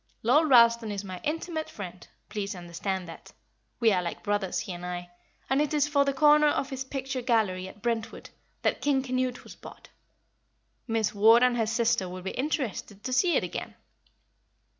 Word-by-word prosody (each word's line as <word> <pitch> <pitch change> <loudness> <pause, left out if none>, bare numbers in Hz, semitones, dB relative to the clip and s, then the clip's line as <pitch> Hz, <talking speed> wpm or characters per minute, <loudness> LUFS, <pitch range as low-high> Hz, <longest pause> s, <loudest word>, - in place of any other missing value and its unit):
Lord 295 +7 +4
Ralston 235 -3 +6
is 200 0 -4
my 185 -2 -7
intimate 315 +1 -3
friend, 180 -3 -9 0.2
please 205 -1 -4
understand 180 +1 -4
that. 165 - -12 0.5
We 225 -1 +4
are 185 -2 +2
like 170 -1 -5
brothers, 205 -3 -1
he 200 -4 -6
and 175 0 -8
I, 175 0 -5 0.4
and 270 +2 +2
it 300 +1 0
is 295 -1 +2
for 285 -1 +2
the 280 - +1
corner 300 +2 +5
of 280 -1 0
his 265 0 -3
picture 265 -1 -4
gallery, 215 -7 +1
at 200 +2 -14
Brentwood, 230 -2 -3 0.3
that - - 0
King 275 -2 +1
Canute 255 -1 -2
was - - -11
bought; - - -13 1.0
Miss 225 -2 0
Ward 225 +4 +6
and 250 -1 +4
her 225 -2 0
sister 225 -4 +1
will 185 0 -8
be 190 - -3
interested 255 - -3
to 255 - -3
see 340 +7 +3
it - - +2
again. - - -5
230 Hz, 185 wpm, -28 LUFS, 195-270 Hz, 1.0 s, Ralston